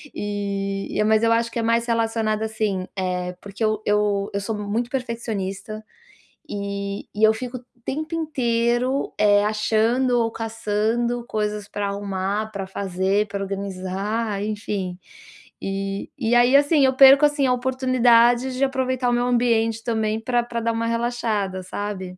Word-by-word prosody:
E 200 -1 -3
e 210 - +3
mas 220 +1 +3
eu 230 - +4
acho 230 0 +1
que 235 - -3
é - - -1
mais 230 +1 +2
relacionado, 225 -2 0
assim, 215 -4 -2
eh, 180 -1 -2
porque 200 +2 -6
eu 215 -1 +1
eu 205 -1 +1
eu 200 - 0
sou 215 +2 -3
muito 215 +4 -2
perfeccionista 215 -4 -4 0.7
e 200 0 -4
e 210 - -1
eu 220 0 +7
fico 250 +3 -5
o - - -22 0.2
tempo 310 +4 -3
inteiro, 250 -3 0
eh, 205 0 +4
achando 225 +4 +2
ou 230 - +1
caçando 225 +2 -1
coisas 210 -2 -2
para 205 -1 -2
arrumar, 200 +1 -2
para 195 -2 -4
fazer, 190 +2 0
para 200 -1 -4
organizar, 195 +2 -3
enfim, 205 -4 -3 0.6
e 195 0 -3
e 240 -4 0
aí, 245 +2 +5
assim, 285 +1 +5
eu 260 - +3
perco, 275 +2 +8
assim, 290 -1 +2
a 250 - +3
oportunidade 250 -1 +3
de 270 - +1
aproveitar 260 -1 -1
o - - +1
meu 240 0 +1
ambiente 230 -2 +1
também 220 -2 0
para 240 +1 +1
para 235 -1 -4
dar 230 - +1
uma 230 0 -1
relaxada, 230 -5 -1
sabe? 190 -1 -5
220 Hz, 155 wpm, -23 LUFS, 200-240 Hz, 0.7 s, perco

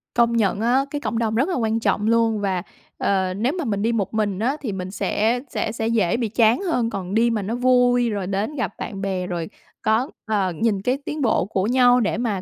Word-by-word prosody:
Công 235 -1 +3
nhận 200 -2 +1
á, 250 +4 +2
cái 290 - -3
cộng 230 - -2
đồng 220 -2 0
rất 270 +10 +1
là - - -1
quan 225 -2 0
trọng 215 -1 0
luôn. 225 -1 +2
Và, 190 -3 -1 0.3
ờ, 190 -2 0
nếu 230 +9 0
mà 330 - -2
mình 200 -4 -1
đi 225 +3 +1
một 220 -3 -1
mình 205 -3 -1
á, 260 +7 0
thì 245 -7 -3
mình 185 -1 -5
sẽ 220 +4 0
sẽ 220 - -2
sẽ 225 0 -2
dễ 225 -4 +1
bị 235 -3 -1
chán 225 +2 +3
hơn, 250 -12 0
còn 190 -3 -5
đi 230 +2 +3
mà 225 -2 -1
nó 210 +4 -3
vui, 245 -1 +3
rồi 200 -4 -3
đến 200 +9 -2
gặp 275 - -2
bạn 195 -3 -6
bè, 190 -2 -2
rồi 170 -1 -4 0.3
có 220 +5 +1 0.2
ờ, 205 -4 0
nhìn 215 -4 +1
cái 250 +6 0
tiến 300 0 -4
bộ 220 -8 +2
của 190 -1 -1
nhau 245 0 +5
để 215 -1 0
mà 220 -5 -1
225 Hz, 240 wpm, -22 LUFS, 200-245 Hz, 0.3 s, nhau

